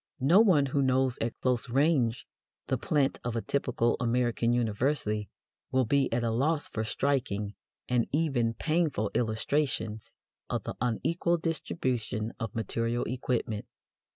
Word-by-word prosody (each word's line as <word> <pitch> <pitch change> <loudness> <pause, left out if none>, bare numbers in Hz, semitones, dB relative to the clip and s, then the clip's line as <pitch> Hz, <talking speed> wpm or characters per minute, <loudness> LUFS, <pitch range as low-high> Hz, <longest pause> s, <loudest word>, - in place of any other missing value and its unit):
No 150 +9 +5
one 180 -11 +5
who 140 +1 0
knows 130 -1 +2
at 115 0 -2
close 125 -1 0
range 130 -3 +2 0.4
the - - 0
"plant" 140 -3 +1
of 120 -1 -3
a 115 - 0
typical 120 0 0
American 120 -1 +1
university 110 -2 0 0.4
will 130 -1 +3
be 140 +4 +2
at 120 +1 0
a 115 - +1
loss 145 +6 +1
for 110 - -3
striking 110 -5 -1 0.3
and 125 -2 +1
even 135 -7 +1
painful 155 -10 0
illustrations 110 -1 -1 0.4
of - - -2
the - - -4
unequal 165 +9 +1
distribution 125 -9 -2
of 115 -3 -4
material 115 +1 -1
equipment. 120 -3 -2
125 Hz, 135 wpm, -29 LUFS, 115-140 Hz, 0.4 s, No